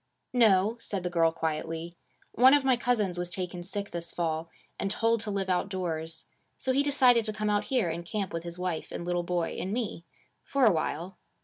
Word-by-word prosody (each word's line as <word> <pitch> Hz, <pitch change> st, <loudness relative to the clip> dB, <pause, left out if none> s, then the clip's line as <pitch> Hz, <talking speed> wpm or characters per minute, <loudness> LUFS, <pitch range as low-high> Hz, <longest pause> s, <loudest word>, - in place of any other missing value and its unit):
'No,' 220 Hz, -2 st, +4 dB
said 195 Hz, -5 st, -3 dB
the 180 Hz, -, -2 dB
girl 165 Hz, -2 st, +3 dB
quietly. 165 Hz, +1 st, -3 dB, 0.4 s
'One 260 Hz, +4 st, +7 dB
of 285 Hz, -2 st, +1 dB
my 260 Hz, -1 st, +5 dB
cousins 220 Hz, -8 st, 0 dB
was 175 Hz, 0 st, -3 dB
taken 180 Hz, -1 st, -4 dB
sick 200 Hz, +3 st, -4 dB
this 170 Hz, -1 st, 0 dB
fall, 165 Hz, -1 st, -2 dB, 0.3 s
and 195 Hz, -, -1 dB
told 230 Hz, +3 st, +2 dB
to 210 Hz, 0 st, -4 dB
live 200 Hz, -2 st, -1 dB
outdoors. 175 Hz, -4 st, -1 dB, 0.3 s
So 260 Hz, -, -1 dB
he 275 Hz, -, +4 dB
decided 260 Hz, -5 st, +4 dB
to 215 Hz, -, -2 dB
come 210 Hz, 0 st, -1 dB
out 205 Hz, 0 st, +1 dB
here 250 Hz, -8 st, +1 dB
and 170 Hz, +1 st, -4 dB
camp 195 Hz, +2 st, -3 dB
with 165 Hz, -, -2 dB
his 170 Hz, +1 st, -7 dB
wife 180 Hz, -3 st, -3 dB
and 170 Hz, -, -5 dB
little 175 Hz, 0 st, 0 dB
boy 175 Hz, -1 st, -1 dB
and 190 Hz, -, -3 dB
me. 215 Hz, -7 st, -3 dB, 0.4 s
For 275 Hz, -2 st, +2 dB
a 220 Hz, -, +7 dB
while.' 170 Hz, +3 st, -3 dB
185 Hz, 205 wpm, -29 LUFS, 170-225 Hz, 0.4 s, One